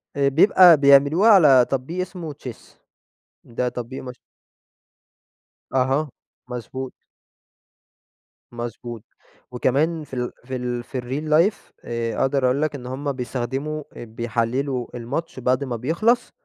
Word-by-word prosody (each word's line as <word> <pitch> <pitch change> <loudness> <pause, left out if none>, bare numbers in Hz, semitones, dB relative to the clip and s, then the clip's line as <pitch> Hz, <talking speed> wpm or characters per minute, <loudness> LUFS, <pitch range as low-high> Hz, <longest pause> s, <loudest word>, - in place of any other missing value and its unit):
آآ 140 -1 +2
بيبقى 170 +3 +7
بيعملوها 140 +8 +5
على 145 - +7
تطبيق 140 +7 -2
اسمه 175 -4 -6
Chess 130 -4 -11 0.7
ده 125 +1 -2
تطبيق 125 +1 -6
مش 125 -1 -9 1.6
أها، 135 +3 +1 0.4
مضبوط. 125 +2 -6 1.6
مضبوط 120 -1 -7 0.5
وكمان 150 +6 0
في 145 - -17
ال 125 -1 -2
في 130 +2 -6
ال 125 -1 -3
في 125 +1 -5
الReal 135 +6 -4 0.2
Life - - -21 0.3
آآ، 115 -1 -3
أقدر 135 0 +1
أقول 130 +3 +1
لك 155 -1 -1
إن 125 -3 -8
هم 135 +3 -3
بيستخدموا 135 +4 -4
اب 115 -2 -11
بيحللوا 120 +3 -1
الماتش 130 +6 -5
بعد 130 +2 +1
ما 130 -3 -3
بيخلص 170 - +1
130 Hz, 125 wpm, -22 LUFS, 125-150 Hz, 1.6 s, بيبقى